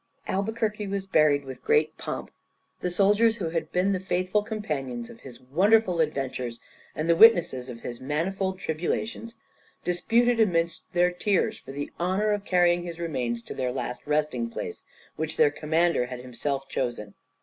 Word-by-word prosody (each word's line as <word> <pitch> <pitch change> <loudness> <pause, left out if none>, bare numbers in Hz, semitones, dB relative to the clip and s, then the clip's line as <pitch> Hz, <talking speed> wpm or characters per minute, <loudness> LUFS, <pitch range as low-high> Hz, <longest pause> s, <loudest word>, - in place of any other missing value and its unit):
Albuquerque 210 +1 -1
was 195 0 -3
buried 150 -6 +3
with 130 -1 -9
great 455 0 +2
pomp. - - -5 0.5
The 180 - -1
soldiers 205 +5 +4
who 180 -8 -3
had 165 0 -3
been 185 +2 +2
the 190 - 0
faithful 185 +2 0
companions 145 - -4
of - - -14
his 125 -3 -12
wonderful 185 - +3
adventures, 130 -6 -2 0.4
and 155 +2 -2
the 170 - +5
witnesses 170 - +6
of 115 -1 -8
his 120 -1 -7
manifold 190 +7 -1
tribulations, 195 +7 -3 0.5
disputed 230 +7 +2
amidst 170 -6 +1
their 180 0 +3
tears 195 +2 0
for 135 - -10
the 145 +1 -5
honour 190 +5 +1
of 205 -1 -1
carrying 175 -1 +3
his 170 -1 -7
remains 125 -8 -2
to - - -7
their 125 -1 -2
last 125 +1 -5
resting 155 +10 0
place, 445 - -6 0.3
which - - -3
their 460 -2 +5
commander 160 -4 +1
had 125 -1 -6
himself 135 +2 -3
chosen. 120 -7 -3
175 Hz, 160 wpm, -26 LUFS, 135-200 Hz, 0.5 s, witnesses